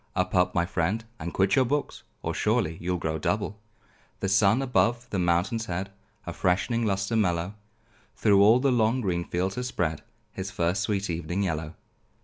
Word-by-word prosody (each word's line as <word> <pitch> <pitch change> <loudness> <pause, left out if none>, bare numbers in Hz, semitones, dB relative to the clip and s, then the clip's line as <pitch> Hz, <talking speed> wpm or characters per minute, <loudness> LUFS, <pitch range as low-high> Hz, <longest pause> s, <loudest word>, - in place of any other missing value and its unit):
Up! 90 0 0
up! 90 0 +2
my 85 -1 +2
friend, 95 +5 -1
and 85 +1 -4
quit 95 0 +2
your 135 - +5
books, 145 +4 -2 0.2
Or - - -2
surely 80 +1 +1
you'll 90 +1 -1
grow 80 -1 -2
double. 105 +4 -2 0.6
The 95 - -1
sun, 100 +6 +4
above 120 -1 +1
the 100 - -1
mountain's 90 +7 +1
head, 95 +2 -3 0.3
A - - -5
freshening 110 +6 +1
lustre 100 +2 -1
mellow 90 -3 +1 0.6
Through 100 -2 +4
all 110 +4 +6
the 135 +1 +2
long 120 +1 +2
green 90 -5 -1
fields 90 +3 -2
has 125 0 -2
spread, 80 -10 -2 0.3
His 95 0 -5
first 90 -1 0
sweet 100 -2 -1
evening 85 +4 -2
yellow. 80 -3 -3
95 Hz, 175 wpm, -27 LUFS, 85-110 Hz, 0.6 s, all